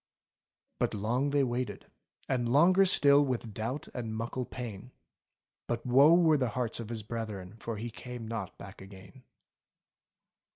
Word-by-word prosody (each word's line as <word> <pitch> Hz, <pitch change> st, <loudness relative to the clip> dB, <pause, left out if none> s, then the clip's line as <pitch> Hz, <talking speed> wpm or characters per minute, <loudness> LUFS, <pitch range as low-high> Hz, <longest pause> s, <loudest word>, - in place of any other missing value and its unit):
But -, -, 0 dB
long 120 Hz, +7 st, 0 dB
they 140 Hz, -1 st, +2 dB
waited, 125 Hz, 0 st, -3 dB, 0.4 s
and 120 Hz, -3 st, 0 dB
longer 180 Hz, +8 st, +5 dB
still, 145 Hz, -5 st, +5 dB
With 120 Hz, -5 st, -3 dB
doubt 115 Hz, +8 st, -4 dB
and 115 Hz, -3 st, -4 dB
muckle 120 Hz, +3 st, -3 dB
pain. 120 Hz, -1 st, -8 dB, 0.7 s
But 120 Hz, 0 st, -3 dB
woe 140 Hz, +6 st, +6 dB
were 165 Hz, -3 st, +4 dB
the 130 Hz, -3 st, 0 dB
hearts 120 Hz, 0 st, -2 dB
of 115 Hz, -2 st, -6 dB
his 115 Hz, -2 st, -4 dB
brethren. 110 Hz, -3 st, -6 dB
For 115 Hz, -1 st, -5 dB
he 115 Hz, +2 st, -5 dB
came 120 Hz, 0 st, -8 dB
not 110 Hz, -4 st, -5 dB
back 100 Hz, -1 st, -11 dB
again. 95 Hz, +4 st, -13 dB
120 Hz, 150 wpm, -30 LUFS, 110-135 Hz, 0.7 s, woe